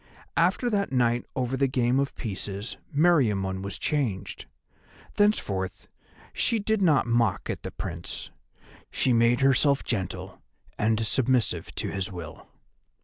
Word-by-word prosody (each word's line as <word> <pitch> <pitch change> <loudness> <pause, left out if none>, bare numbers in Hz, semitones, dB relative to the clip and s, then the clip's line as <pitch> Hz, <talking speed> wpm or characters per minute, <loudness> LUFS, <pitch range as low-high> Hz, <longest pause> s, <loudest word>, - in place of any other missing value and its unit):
After 245 - +2
that 200 -5 0
night 120 -2 +1
over 130 0 -1
the 135 +1 +2
game 125 0 +1
of 140 0 -1
pieces 100 0 -4 0.2
Meriamun 110 - +2
was 100 0 -5
changed. 125 -11 -2 0.7
Thenceforth 100 - 0 0.5
she 230 - +1
did 220 0 0
not 155 -7 +4
mock 115 -5 +1
at - - -6
the - - -5
Prince, 85 0 -6 0.6
she 130 - +1
made 115 +2 +3
herself 135 +1 +3
gentle 95 -7 -4 0.3
and 110 +1 +1
submissive 125 +2 +1
to - - -2
his 95 -1 -3
will. 85 -5 -9
120 Hz, 130 wpm, -27 LUFS, 100-140 Hz, 0.7 s, not